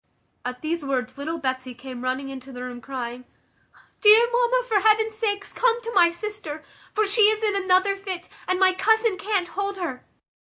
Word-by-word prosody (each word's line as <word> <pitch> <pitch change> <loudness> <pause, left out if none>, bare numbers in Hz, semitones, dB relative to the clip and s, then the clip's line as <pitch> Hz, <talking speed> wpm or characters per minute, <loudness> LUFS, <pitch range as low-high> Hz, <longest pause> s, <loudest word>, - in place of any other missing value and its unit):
At 250 +2 -6
these 325 0 -2
words 260 -1 -3
little 320 +4 -3
Betsy 260 -3 -3
came 250 0 -8
running 260 +2 -2
into 270 0 -9
the 250 -1 -7
room, 245 -1 -7
crying, 250 -1 -6 0.8
"Dear 435 +2 +8
mamma, - - +2
for 435 -4 +3
heaven's 440 +2 +3
sake 410 -2 -2
come 475 -1 +2
to 465 +1 -5
my 350 -4 +6
sister; 345 -4 -6 0.3
for 430 0 +1
she 415 +1 +5
is 435 0 -1
in 420 -2 +1
another 380 0 +3
fit, 380 -3 -6 0.2
and 370 0 0
my 375 -1 +5
cousin 445 +2 +2
can't 395 -3 -1
hold 400 0 -3
her." 320 -9 -5
370 Hz, 185 wpm, -24 LUFS, 270-425 Hz, 0.8 s, Dear